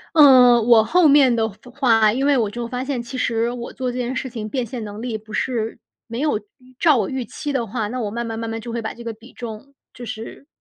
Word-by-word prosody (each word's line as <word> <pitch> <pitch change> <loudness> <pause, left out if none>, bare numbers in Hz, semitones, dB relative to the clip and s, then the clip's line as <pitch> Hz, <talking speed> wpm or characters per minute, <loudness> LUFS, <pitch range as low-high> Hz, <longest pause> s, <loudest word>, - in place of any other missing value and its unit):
嗯， 250 -6 +7
我 230 -2 +6
后 350 +8 +4
面 275 -4 +6
的 220 -1 +1
发 245 +5 -16
话， 230 -5 +3
因 265 +3 -1
为 285 -1 +4
我 220 -4 0
就 235 +2 -5
发 250 +2 -4
现， 265 -3 -2
其 255 +2 -7
实 230 -1 0
我 240 -1 -6
做 255 -1 -3
这 250 - -5
件 250 +1 -2
事 260 - -3
情 220 -3 -5
变 255 +2 -2
现 235 +1 -6
能 210 +1 -7
力 235 -3 -3
不 215 0 -15
是 230 -3 -2 0.3
没 235 +1 -5
有 295 -7 +1
预 255 +5 -23
照 310 -5 +5
我 215 -5 0
预 260 -2 -3
期 290 +6 -5
的 250 -4 -1
话， 220 0 -3
那 250 +3 -4
我 210 -3 -2
慢 235 +2 -4
慢 225 -1 -4
慢 230 0 -4
慢 225 0 -3
就 235 +1 -7
会 235 - -2
把 220 - -5
这 235 - -11
个 230 - -4
比 225 +3 -16
重 235 +4 -8 0.2
就 245 -1 -9
是 225 +4 -8
235 Hz, 290 characters per minute, -21 LUFS, 225-255 Hz, 0.3 s, 嗯